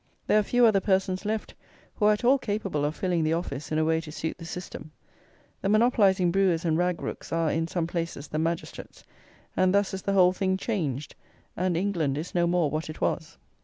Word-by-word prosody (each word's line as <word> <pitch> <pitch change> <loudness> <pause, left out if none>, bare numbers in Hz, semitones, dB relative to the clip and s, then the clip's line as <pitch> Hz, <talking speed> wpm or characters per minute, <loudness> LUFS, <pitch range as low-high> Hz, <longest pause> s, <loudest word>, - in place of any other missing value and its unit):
There 215 - +4
are - - +4
few 245 +4 +3
other 215 -3 +5
persons 190 0 0
left 215 0 -2 0.4
who 210 - 0
are 215 - +6
at 210 - -4
all 265 +3 +5
capable 205 - -2
of 150 +2 -2
filling 180 -3 0
the 155 +1 +1
office 155 -4 -4
in 155 - 0
a 155 - +2
way 160 0 +1
to 160 -2 -9
suit 160 +2 -4
the 165 - -8
system! 175 -2 -7 0.7
The 195 - 0
monopolizing 205 -5 +4
brewers 180 -3 +2
and 160 -2 +2
rag 180 0 0
rooks - - -6
are, 165 -1 +1
in 165 +1 0
some 170 -1 -1
places, 165 -4 -4
the 155 - -3
"magistrates;" 165 +1 -4 0.5
and 185 +1 +3
thus 200 -1 +2
is 190 - -4
the 200 - -1
whole 185 -2 +5
thing 190 0 0
changed, 155 - -3 0.4
and 180 -1 0
England 170 -7 0
is 160 +4 -5
no 175 -1 +2
more 170 -4 +1
what 155 +1 -3
it 155 - -8
was. 160 -3 -2
180 Hz, 215 wpm, -27 LUFS, 160-195 Hz, 0.7 s, are